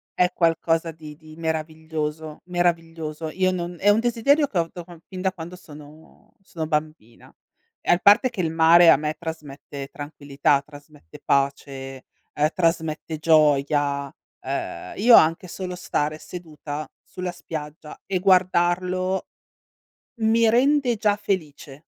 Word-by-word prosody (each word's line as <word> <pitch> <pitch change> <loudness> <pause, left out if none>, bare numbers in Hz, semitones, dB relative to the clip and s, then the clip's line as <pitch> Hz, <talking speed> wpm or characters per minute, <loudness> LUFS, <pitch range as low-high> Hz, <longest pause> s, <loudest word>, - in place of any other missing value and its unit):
è 180 0 +2
qualcosa 165 -1 +1
di 155 -1 -11
di 155 0 -15
meraviglioso, 160 -1 -4
meraviglioso. 165 -3 -2
Io 185 +3 +1
non 175 -1 -4
è 205 - +3
un 210 +2 +5
desiderio 260 +6 +2
che 200 - -5
ho 165 -1 +1
da 175 -2 -7
quan 170 -1 -14
fin 185 -1 -7
da 190 0 +1
quando 175 0 -9
sono 150 -2 -16
sono 165 -4 -6
bambina. 150 -7 -4 0.5
E - - +1
a 175 - +5
parte 235 +7 +5
che 205 - -3
il 165 - 0
mare 165 +1 +6
a 140 - +7
me 150 +1 -2
trasmette 145 -4 -8
tranquillità, 145 -1 -1
trasmette 145 - -15
pace, 135 -1 -2 0.3
ehm, 150 +1 +2
trasmette 160 -2 -1
gioia. 145 -3 +2 0.3
Ehm, 135 +1 -5
io 230 +4 +6
anche 165 +3 +4
solo 180 +1 -6
stare 155 -3 -2
seduta 155 -3 -8
sulla 180 -1 -6
spiaggia 155 -3 -8
e 190 - 0
guardarlo, 185 0 +1 1.0
mi 225 +1 +4
rende 255 +1 +3
già 205 -1 +2
felice. 155 -8 -4
165 Hz, 135 wpm, -23 LUFS, 150-185 Hz, 1.0 s, a